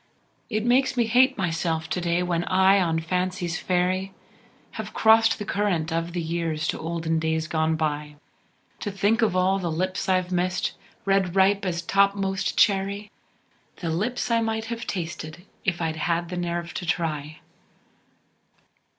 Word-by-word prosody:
It 215 -1 -1
makes 260 +2 +3
me 240 - +3
hate 255 +3 +4
myself 165 -3 -1
to 180 - -1
day 170 +1 +1
when 175 -1 0
I 190 +1 +4
on 165 -2 +1
Fancy's 180 0 -2
ferry 185 +1 0 0.6
Have 220 -1 -7
crossed 225 +1 +5
the 210 - -5
current 180 -7 0
of 165 +1 -2
the 175 - -1
years 165 -1 -2
to - - -2
olden 160 0 -1
days 160 0 0
gone 160 -1 +1
by, 150 -1 -2 0.6
T' 205 - -3
think 205 +4 +1
of 215 -5 +2
all 185 +1 +2
the 175 -3 -2
lips 185 +4 -2
I've 185 -1 +1
missed, 180 +1 0 0.3
ripe 195 -2 +2
red 195 +1 +4
as 170 -1 -2
topmost 195 0 +1
cherry, 200 0 +2 0.6
The 165 -3 -3
lips 220 +9 -1
I 230 0 +3
might 220 0 -1
have 230 0 -5
tasted 170 -1 -5 0.2
if 175 -2 0
I'd 160 -1 -2
had 170 +1 -1
the 180 - -4
nerve 175 0 -3
t' 175 - -5
try. 155 -3 -2
180 Hz, 160 wpm, -25 LUFS, 165-200 Hz, 0.6 s, crossed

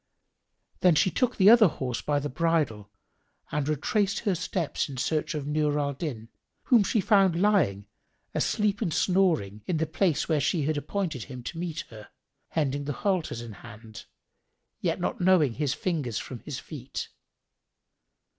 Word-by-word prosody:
Then 180 -3 +5
she 180 +4 +3
took 250 -1 0
the 200 +2 +7
other 230 -3 +8
horse 130 -6 -3
by 145 -1 0
the 145 +1 -1
bridle 145 - 0 0.6
and 150 0 -1
retraced 195 +7 0
her 205 -4 +1
steps 170 -3 -2
in 135 - -7
search 155 +4 -1
of 145 -2 -3
Nur 150 0 +1
al 140 -1 0
Din, 130 -7 -5 0.3
whom 235 -5 +5
she 220 - +1
found 195 -4 +3
lying, 185 - +2 0.5
asleep 210 -1 0
and 170 - 0
snoring, 160 - +1
in 170 - 0
the 160 - +1
place 160 0 0
where 155 -3 +1
she 155 +2 +1
had 155 +2 0
appointed 155 - -3
him 125 -3 -9
to 165 - -6
meet 170 -2 -3
her, 110 -2 -11 0.4
hending 145 -2 -1
the 145 - -2
halters 180 - 0
in 120 -1 -8
hand, 110 +1 -12 0.7
yet - - -1
knowing 175 -7 +3
not - - -11
his 145 -3 0
fingers 145 - -2
from 125 - -6
his 140 +1 -6
feet. 140 -2 -7
155 Hz, 165 wpm, -27 LUFS, 130-185 Hz, 0.7 s, other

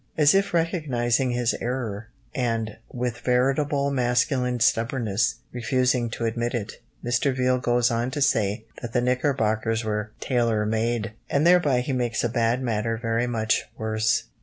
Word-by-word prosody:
As 150 -2 +5
if 195 +1 +2
recognising 140 -8 0
his 120 -1 +1
error, 115 -4 -3 0.3
and, 115 -5 -2
with 125 -1 -3
veritable 140 +3 +1
masculine 125 0 +1
stubbornness, 115 -2 +1 0.2
refusing 125 0 +1
to 115 0 -4
admit 120 +2 -1
it, 105 -4 -5 0.2
Mr. 125 +3 +1
Viele 125 0 +2
goes 120 0 +2
on 120 +2 0
to 140 +3 -4
say 110 -7 +1 0.2
that 115 -2 -6
the 125 - +2
knickerbockers 115 -3 0
were 105 -1 -2
"tailor 115 -4 +1
made!" 110 0 -1 0.2
And 140 +3 +2
thereby 170 -8 +4
he 135 +2 -3
makes 120 -3 -1
a 120 - +1
bad 120 +2 +1
matter 115 -1 -1
very 115 +1 -1
much 110 -2 0
worse. 110 0 0
120 Hz, 150 wpm, -25 LUFS, 115-130 Hz, 0.3 s, As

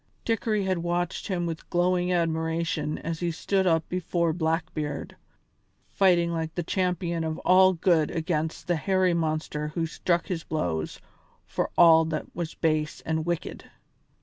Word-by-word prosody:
Dickory 220 -2 0
had 185 -2 0
watched 175 0 -2
him 180 -4 -1
with 165 -1 -5
glowing 180 +1 +1
admiration 160 -2 0
as 165 0 -4
he 175 - -1
stood 190 +3 0
up 165 -2 +2
before 170 -2 0
Blackbeard, 160 -3 -2 0.8
fighting 175 -3 +3
like 160 -1 -3
the 175 - -1
champion 175 -2 -1
of 160 0 -2
all 185 +1 +6
good 165 -3 +2
against 160 -1 -2
the 175 -1 +1
hairy 185 +1 +2
monster 155 -2 -1
who 165 +2 -2
struck 170 +1 0
his 170 -4 -3
blows 85 - -2 0.5
for - - -2
all 165 -1 +7
that 155 -1 -3
was 170 -1 -4
base 155 -2 0
and 160 0 -2
wicked. 175 -1 -3
170 Hz, 150 wpm, -26 LUFS, 160-180 Hz, 0.8 s, all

